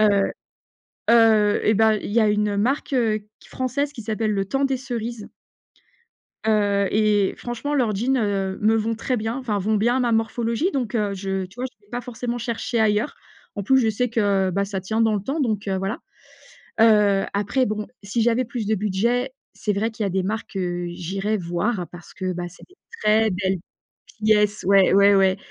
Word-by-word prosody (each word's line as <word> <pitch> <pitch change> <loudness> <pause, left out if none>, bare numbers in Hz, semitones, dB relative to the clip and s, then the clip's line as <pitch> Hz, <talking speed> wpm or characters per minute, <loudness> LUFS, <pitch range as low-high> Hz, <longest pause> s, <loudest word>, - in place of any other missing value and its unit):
heu, 200 -2 +3 0.8
heu 220 -3 +5
et 215 - +4
ben, 220 +1 +4
il 210 - -4
y 230 - +4
a 215 - +4
une 210 -1 +1
marque, 265 +7 0
heu, 225 -4 +1 0.2
q - - -18
française 280 +3 -2
qui 245 -6 -8
s'appelle, 215 0 -1
Le 195 -1 0
Temps 275 +5 0
des 270 -1 0
Cerises 235 -4 -5 1.2
heu 205 -2 +2
et 210 -2 +2
franchement 240 +5 -4
leurs 240 -7 +1
jeans 240 +7 0 0.5
me 215 +1 +3
vont 225 +1 0
très 245 +3 -2
bien 225 +2 -3
enfin 240 -6 -2
vont 210 +3 0
bien 235 +4 +2
à - - +1
ma 240 -2 +1
morphologie 230 - 0
donc 245 -5 -2
heu, 210 -3 0
je 195 0 -3
tu 190 +5 -14
vois, 255 - -2
je 210 -5 -18
vais 205 - -28
pas 245 - -3
forcément 245 0 -4
chercher 235 0 -2
ailleurs. 215 +4 +1 0.4
En 200 - -2
plus, 265 +6 +4
je 235 -4 +2
sais 245 +4 -1
que 200 -5 +1
bah 200 +2 0
ça 195 -1 -4
tient 220 +5 -2
dans 220 -1 +3
le 200 - -2
temps 275 +9 -2
donc 215 -6 -1
heu, 190 - 0
voilà. 195 +5 -2 0.8
Heu, 210 -3 +5
après 205 +6 +1
bon, 210 0 -3 0.2
si 215 +4 -1
j'avais 240 +2 +2
plus 235 -2 -5
de 220 - +2
budget, 235 +6 0 0.2
c'est 210 - -1
vrai 210 +3 -1
qu'il 220 -1 -4
y - - +1
a - - -1
des 190 +1 0
marques 215 +4 -4
que 175 -2 -2
j'irais 195 +5 -2
voir 180 +2 -2
parce 175 -1 -13
que, 185 -1 -3
bah, 175 0 -4
c'est 180 - -17
des 370 - -23 0.3
très 220 +1 +3
belles 190 0 -1 0.6
pièces 210 -1 +3
ouais, 195 0 +5
ouais, 200 +1 +6
ouais 190 -1 +4
215 Hz, 205 wpm, -23 LUFS, 200-235 Hz, 1.2 s, ouais